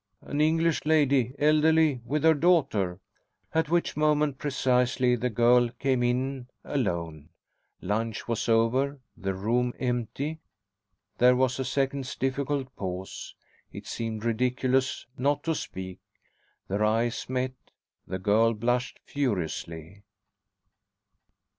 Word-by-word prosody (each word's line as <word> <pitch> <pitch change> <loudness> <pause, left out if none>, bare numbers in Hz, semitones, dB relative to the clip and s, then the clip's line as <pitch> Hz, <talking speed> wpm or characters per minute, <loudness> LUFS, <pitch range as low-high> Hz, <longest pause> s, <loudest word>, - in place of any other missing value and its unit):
"An 145 - -2
English 165 +1 +2
lady, 140 -5 +2
elderly, 155 -2 +3
with 145 +4 -1
her 160 0 +6
daughter 140 - +2 0.3
" - - -42
at 160 -1 +1
which 175 +1 +1
moment 150 -2 +1
precisely 125 -2 +2
the 125 +1 -1
girl 120 +2 +4
came 130 -2 +1
in 125 +1 -1 0.2
alone. 85 - -3 0.5
Lunch 110 +1 -2
was 115 0 -2
over, 130 +5 +2 0.2
the 95 0 -3
room 120 +5 0
empty. 130 +5 -2 0.8
There 125 +1 +6
was 130 0 +1
a - - 0
second's 135 0 -1
difficult 135 0 -2
pause. 95 -1 -6 0.4
It - - -9
seemed 115 -1 -4
ridiculous 125 +3 0
not 140 +2 +1
to 165 - 0
speak. 95 - -6 0.7
Their 100 +2 -1
eyes 115 +3 0
met. 130 0 -1 0.5
The 95 - -3
girl 110 +4 +3
blushed 120 +4 -1
furiously. 90 - -3
125 Hz, 115 wpm, -27 LUFS, 115-140 Hz, 0.8 s, her